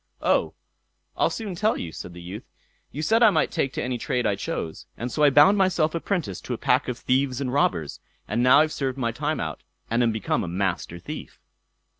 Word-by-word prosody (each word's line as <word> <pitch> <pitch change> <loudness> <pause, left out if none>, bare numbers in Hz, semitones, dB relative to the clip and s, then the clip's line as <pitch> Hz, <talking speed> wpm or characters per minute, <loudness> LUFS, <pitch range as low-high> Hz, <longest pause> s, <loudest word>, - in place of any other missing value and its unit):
"Oh! - - +2 0.6
I'll - - +2
soon 215 -4 -5
tell 215 +5 +1
you", 85 - -5
said 85 - -8
the 90 - -9
youth. 95 +5 -7 0.5
"You 150 - -4
said 225 +8 +3
I 225 - +8
might - - +1
take 145 -6 0
to - - -3
any 125 -1 -2
trade 125 -1 -1
I 105 -2 +2
chose, 85 -3 -5
and 120 +1 -4
so 150 - -2
I 145 - +7
bound 150 +9 +6
myself 175 -5 +2
apprentice 165 - -2
to - - -4
a - - -7
pack - - +2
of 125 - -3
thieves 130 +1 0
and 130 -2 -2
robbers, 80 - 0 0.3
and 120 - 0
now 130 +4 +7
I've 155 0 0
served 135 -2 -2
my 115 -3 0
time 150 +6 -2
out, 80 -3 -4 0.3
and 115 +1 +2
am 115 -1 +3
become 110 -2 -1
a - - -4
Master 90 -1 -2
Thief." 85 - -8
130 Hz, 220 wpm, -25 LUFS, 100-155 Hz, 0.6 s, I